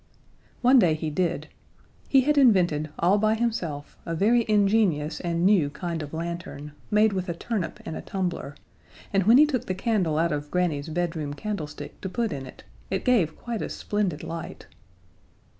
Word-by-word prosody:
One 255 Hz, +2 st, +7 dB
day 170 Hz, -7 st, +4 dB
he 155 Hz, 0 st, -3 dB
did. 175 Hz, +2 st, -1 dB, 0.6 s
He 270 Hz, -, +6 dB
had 295 Hz, +3 st, +2 dB
invented, 180 Hz, -, +4 dB
all 185 Hz, +5 st, +3 dB
by 215 Hz, +1 st, +3 dB
himself, 180 Hz, -11 st, -3 dB
a 165 Hz, -, -3 dB
very 230 Hz, +6 st, +3 dB
ingenious 200 Hz, -7 st, +2 dB
and 170 Hz, 0 st, -1 dB
new 190 Hz, -8 st, +4 dB
kind 170 Hz, +1 st, -4 dB
of 145 Hz, -1 st, -7 dB
lantern, 165 Hz, -3 st, -5 dB, 0.2 s
made 210 Hz, 0 st, +4 dB
with 185 Hz, -1 st, -3 dB
a 170 Hz, -, -2 dB
turnip 205 Hz, -1 st, -3 dB
and 160 Hz, -, -5 dB
a -, -, -5 dB
tumbler, 175 Hz, -6 st, -3 dB, 0.6 s
and 195 Hz, -2 st, +2 dB
when 235 Hz, +3 st, +8 dB
he 300 Hz, -, +8 dB
took 270 Hz, -6 st, -2 dB
the 185 Hz, -, -1 dB
candle 190 Hz, -6 st, 0 dB
out 170 Hz, +1 st, +2 dB
of 145 Hz, 0 st, -3 dB
Granny's 165 Hz, -4 st, -1 dB
bedroom 160 Hz, -3 st, -2 dB
candlestick 160 Hz, -7 st, -6 dB
to 190 Hz, -, -4 dB
put 230 Hz, +3 st, -1 dB
in 135 Hz, -1 st, -6 dB
it, -, -, -13 dB, 0.3 s
it 190 Hz, -, -2 dB
gave 205 Hz, -11 st, +2 dB
quite 235 Hz, -2 st, -4 dB
a -, -, -3 dB
splendid 195 Hz, -7 st, -2 dB
light. 165 Hz, 0 st, -7 dB
180 Hz, 175 wpm, -26 LUFS, 160-215 Hz, 0.6 s, when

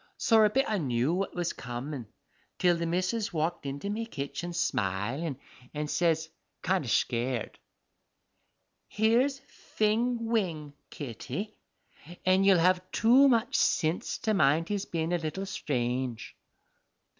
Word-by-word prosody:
sorra 220 Hz, -2 st, +5 dB
a -, -, -1 dB
bit 265 Hz, +6 st, +2 dB
I 215 Hz, -2 st, 0 dB
knew 130 Hz, 0 st, 0 dB
what 190 Hz, +2 st, -2 dB
was 175 Hz, -1 st, -1 dB
comin' 125 Hz, 0 st, -6 dB, 0.5 s
till 175 Hz, -1 st, +3 dB
the 170 Hz, 0 st, -2 dB
missus 185 Hz, +6 st, -1 dB
walked 160 Hz, -2 st, -2 dB
into 140 Hz, +7 st, -5 dB
me 220 Hz, +3 st, -3 dB
kitchen 140 Hz, 0 st, -5 dB
smilin', 120 Hz, -, -1 dB, 0.4 s
and 150 Hz, 0 st, -2 dB
says, 165 Hz, -2 st, +1 dB, 0.4 s
kind -, -, +1 dB
o' -, -, -7 dB
schared, 120 Hz, 0 st, -1 dB, 1.3 s
"Here's 235 Hz, +6 st, +2 dB
Fing 235 Hz, -2 st, -1 dB
Wing, 170 Hz, -11 st, -1 dB, 0.2 s
Kitty, 145 Hz, -, -6 dB, 0.7 s
an' 185 Hz, +1 st, +4 dB
you'll 195 Hz, -2 st, +6 dB
have 180 Hz, +2 st, +3 dB
too 250 Hz, +5 st, +5 dB
much 240 Hz, -2 st, +2 dB
sinse 160 Hz, +2 st, +1 dB
to 220 Hz, -2 st, +2 dB
mind 160 Hz, -1 st, +3 dB
his 205 Hz, -1 st, -1 dB
bein' 165 Hz, 0 st, -2 dB
a 175 Hz, -, +1 dB
little 165 Hz, +5 st, -4 dB
strange." 125 Hz, -, -3 dB
170 Hz, 135 wpm, -29 LUFS, 140-210 Hz, 1.3 s, you'll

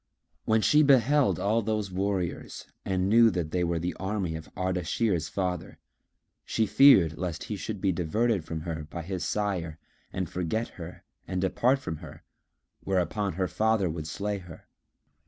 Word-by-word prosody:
When 110 Hz, 0 st, +3 dB
she 150 Hz, -, +5 dB
beheld 140 Hz, 0 st, +4 dB
all 110 Hz, +3 st, +2 dB
those 105 Hz, -2 st, -2 dB
warriors 95 Hz, -1 st, -3 dB, 0.2 s
and 95 Hz, -1 st, 0 dB
knew 115 Hz, +2 st, +6 dB
that 85 Hz, -6 st, -3 dB
they 90 Hz, +1 st, 0 dB
were 85 Hz, -1 st, 0 dB
the 85 Hz, +2 st, -2 dB
army 95 Hz, -4 st, -2 dB
of 80 Hz, -1 st, -8 dB
Ardashir's 90 Hz, -1 st, 0 dB
father, 90 Hz, -3 st, -3 dB, 0.7 s
she 110 Hz, -, 0 dB
feared 95 Hz, -, +6 dB
lest 85 Hz, -3 st, -3 dB
he 105 Hz, -, -4 dB
should 105 Hz, +1 st, -5 dB
be 95 Hz, 0 st, +1 dB
diverted 95 Hz, +4 st, 0 dB
from 80 Hz, 0 st, -5 dB
her 80 Hz, -1 st, -5 dB
by 85 Hz, 0 st, -6 dB
his 90 Hz, +1 st, -4 dB
sire 90 Hz, -7 st, -2 dB, 0.3 s
and 95 Hz, -2 st, -3 dB
forget 90 Hz, +8 st, -2 dB
her 85 Hz, 0 st, -10 dB, 0.2 s
and 95 Hz, -1 st, -2 dB
depart 120 Hz, +8 st, +2 dB
from 105 Hz, -12 st, -5 dB
her, -, -, -12 dB, 0.6 s
whereupon 95 Hz, +1 st, 0 dB
her 95 Hz, +2 st, -1 dB
father 110 Hz, -5 st, +1 dB
would 80 Hz, -1 st, -5 dB
slay 100 Hz, +5 st, -3 dB
her. 85 Hz, -3 st, -13 dB
95 Hz, 160 wpm, -28 LUFS, 85-110 Hz, 0.7 s, knew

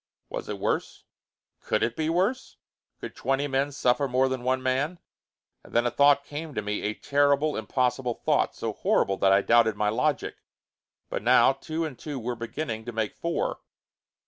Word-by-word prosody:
Was -, -, -6 dB
it -, -, -3 dB
worse? -, -, -2 dB, 0.6 s
Could -, -, -1 dB
it 120 Hz, -, 0 dB
be 155 Hz, 0 st, -1 dB
worse? 190 Hz, +10 st, -1 dB, 0.4 s
Could -, -, -8 dB
twenty 135 Hz, +2 st, 0 dB
men 135 Hz, +1 st, 0 dB
suffer 135 Hz, +1 st, +1 dB
more 130 Hz, +1 st, +2 dB
than 130 Hz, -1 st, -3 dB
one 130 Hz, +1 st, 0 dB
man? 135 Hz, +7 st, 0 dB, 0.7 s
And -, -, -16 dB
then 120 Hz, +1 st, +3 dB
a 120 Hz, -, +1 dB
thought 140 Hz, +2 st, +4 dB
came 150 Hz, 0 st, -7 dB
to 105 Hz, -, -1 dB
me, 105 Hz, 0 st, -2 dB
a 105 Hz, +1 st, -2 dB
terrible, 145 Hz, +1 st, +2 dB
impossible 125 Hz, +2 st, -1 dB
thought, -, -, 0 dB
so -, -, -3 dB
horrible 95 Hz, 0 st, +1 dB
that 95 Hz, -, +3 dB
I 100 Hz, 0 st, +4 dB
doubted 115 Hz, -2 st, +4 dB
my 105 Hz, 0 st, +1 dB
logic. 125 Hz, +6 st, -1 dB, 0.7 s
But -, -, -2 dB
now 120 Hz, +3 st, +5 dB
two 160 Hz, +4 st, -4 dB
and 145 Hz, -6 st, -7 dB
two 150 Hz, -3 st, -5 dB
were 120 Hz, +1 st, -3 dB
beginning 115 Hz, 0 st, -4 dB
to 120 Hz, -, -5 dB
make 110 Hz, -2 st, -2 dB
four. 170 Hz, 0 st, -2 dB
130 Hz, 180 wpm, -26 LUFS, 115-145 Hz, 0.7 s, now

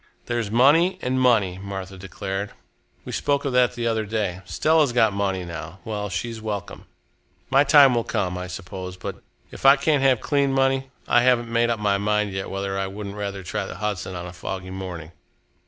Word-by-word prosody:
"There's 120 Hz, -3 st, -2 dB
money 145 Hz, -, +4 dB
and 130 Hz, +1 st, 0 dB
money," 105 Hz, -8 st, +3 dB
Martha 95 Hz, -1 st, -6 dB
declared. 95 Hz, +1 st, -5 dB, 0.5 s
"We -, -, -6 dB
spoke 140 Hz, -1 st, 0 dB
of 135 Hz, -, -1 dB
that 125 Hz, -1 st, +3 dB
the 120 Hz, -1 st, -3 dB
other 110 Hz, -1 st, +1 dB
day. 105 Hz, -4 st, -2 dB
Stella's 155 Hz, -, +2 dB
got 110 Hz, -4 st, +3 dB
money 95 Hz, -2 st, -1 dB
now. 85 Hz, 0 st, -7 dB
Well, 105 Hz, -2 st, -3 dB
she's 115 Hz, +4 st, -4 dB
welcome. 105 Hz, -3 st, -5 dB, 0.7 s
My 135 Hz, +1 st, +6 dB
time 140 Hz, -2 st, +7 dB
will 120 Hz, -1 st, +1 dB
come, 90 Hz, -4 st, -2 dB
I 90 Hz, 0 st, -5 dB
suppose, 90 Hz, 0 st, -7 dB
but -, -, -7 dB, 0.3 s
if -, -, -11 dB
I 135 Hz, +1 st, +8 dB
can't 145 Hz, 0 st, +1 dB
have 130 Hz, -3 st, +4 dB
clean 140 Hz, 0 st, +1 dB
money, 135 Hz, 0 st, +1 dB, 0.2 s
I 120 Hz, -, +5 dB
haven't 120 Hz, -2 st, +2 dB
made 120 Hz, 0 st, +3 dB
up 115 Hz, -2 st, 0 dB
my 100 Hz, -2 st, +1 dB
mind 105 Hz, 0 st, 0 dB
yet 95 Hz, 0 st, -4 dB
whether 95 Hz, 0 st, -3 dB
I 95 Hz, -, -1 dB
wouldn't 100 Hz, +1 st, -7 dB
rather 100 Hz, -2 st, -4 dB
try 100 Hz, +2 st, -3 dB
the -, -, -7 dB
Hudson 100 Hz, -3 st, -3 dB
on 90 Hz, 0 st, -5 dB
a 90 Hz, -, -8 dB
foggy 95 Hz, +1 st, -6 dB
morning." 90 Hz, -4 st, -7 dB
105 Hz, 195 wpm, -23 LUFS, 95-125 Hz, 0.7 s, I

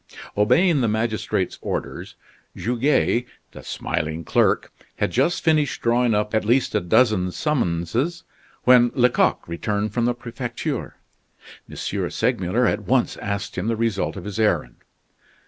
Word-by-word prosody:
Obeying 150 Hz, -, +3 dB
the 120 Hz, -, +2 dB
magistrate's 110 Hz, -4 st, -1 dB
orders, -, -, -5 dB, 0.4 s
Goguet, 125 Hz, 0 st, +1 dB, 0.2 s
the -, -, -11 dB
smiling 80 Hz, +2 st, -3 dB
clerk, -, -, +1 dB, 0.2 s
had -, -, -1 dB
just 140 Hz, +8 st, +1 dB
finished 155 Hz, -5 st, +1 dB
drawing 120 Hz, -1 st, +2 dB
up 105 Hz, +1 st, -1 dB
at 110 Hz, -, +2 dB
least 120 Hz, +5 st, +2 dB
a 105 Hz, -, +3 dB
dozen 95 Hz, 0 st, +3 dB
summonses, 130 Hz, -, -1 dB, 0.4 s
when 125 Hz, -1 st, +6 dB
Lecoq 125 Hz, -1 st, +2 dB
returned 105 Hz, +5 st, -2 dB
from 120 Hz, -1 st, +1 dB
the 120 Hz, 0 st, +1 dB
Prefecture. 120 Hz, 0 st, -5 dB, 0.7 s
M. -, -, -10 dB, 0.3 s
Segmuller 115 Hz, -1 st, 0 dB
at 105 Hz, -1 st, +1 dB
once 130 Hz, -1 st, +2 dB
asked 100 Hz, -2 st, -4 dB
him 95 Hz, -, -3 dB
the 115 Hz, -, +1 dB
result 110 Hz, -3 st, -1 dB
of 95 Hz, -, -7 dB
his 105 Hz, +1 st, -5 dB
errand. 105 Hz, -, +1 dB
115 Hz, 135 wpm, -23 LUFS, 105-125 Hz, 0.7 s, when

